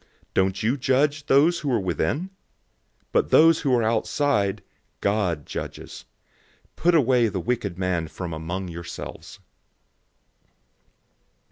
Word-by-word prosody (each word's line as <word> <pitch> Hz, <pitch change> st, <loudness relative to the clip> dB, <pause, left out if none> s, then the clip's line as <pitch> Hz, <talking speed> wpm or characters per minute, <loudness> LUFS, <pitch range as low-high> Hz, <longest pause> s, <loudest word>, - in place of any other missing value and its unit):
Don't 95 Hz, +2 st, +1 dB
you 120 Hz, +6 st, +1 dB
judge 145 Hz, +3 st, +1 dB
those 155 Hz, +6 st, +4 dB
who 145 Hz, -4 st, -2 dB
are 120 Hz, -, +2 dB
within? 95 Hz, -, -1 dB
005:013 185 Hz, -, -7 dB, 0.8 s
But 465 Hz, -, +1 dB
those 165 Hz, 0 st, +6 dB
who 135 Hz, -5 st, +2 dB
are 120 Hz, -, +2 dB
outside, 110 Hz, -2 st, 0 dB, 0.4 s
God 100 Hz, -7 st, 0 dB
judges. -, -, -7 dB, 0.7 s
"Put 175 Hz, +1 st, +2 dB
away 125 Hz, -5 st, +4 dB
the 100 Hz, -3 st, -3 dB
wicked 100 Hz, -3 st, -2 dB
man 90 Hz, -3 st, -1 dB
from 85 Hz, +1 st, -6 dB
among 85 Hz, +4 st, -4 dB
yourselves." 85 Hz, 0 st, -8 dB
110 Hz, 120 wpm, -24 LUFS, 95-145 Hz, 0.8 s, those